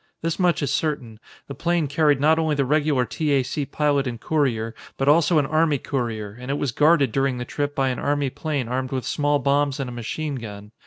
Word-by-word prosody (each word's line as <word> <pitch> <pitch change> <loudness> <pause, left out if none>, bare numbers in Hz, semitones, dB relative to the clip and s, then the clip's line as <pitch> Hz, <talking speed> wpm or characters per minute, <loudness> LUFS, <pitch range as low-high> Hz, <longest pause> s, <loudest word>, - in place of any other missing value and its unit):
This 165 +2 -1
much 175 -4 +2
is 140 - -1
certain: 125 -8 -2 0.3
The 140 - -6
plane 170 +3 0
carried 145 0 +2
not 155 +3 +4
only 160 -2 +1
the 140 -1 +1
regular 145 -2 +2
T. 150 +3 -1
A. 135 -2 +3
C. 140 +2 -3
pilot 145 -1 +1
and 120 -2 -4
courier, 115 -7 0 0.2
but 135 - -1
also 160 +3 +4
an 145 - +3
army 155 0 +2
courier, 115 -7 -3
and 125 +1 -8
it 140 - 0
was 140 -4 -1
guarded 150 -1 +3
during 135 +1 0
the 125 - -4
trip 145 +3 -3
by 135 -1 +1
an 125 - -3
army 145 -2 0
plane 145 -5 -3
armed 130 +1 -2
with 130 -2 -2
small 145 -1 +1
bombs 140 +1 +1
and 135 - -2
a 125 - -6
machine 135 +5 -4
gun. 105 -3 -9
140 Hz, 225 wpm, -23 LUFS, 125-150 Hz, 0.3 s, not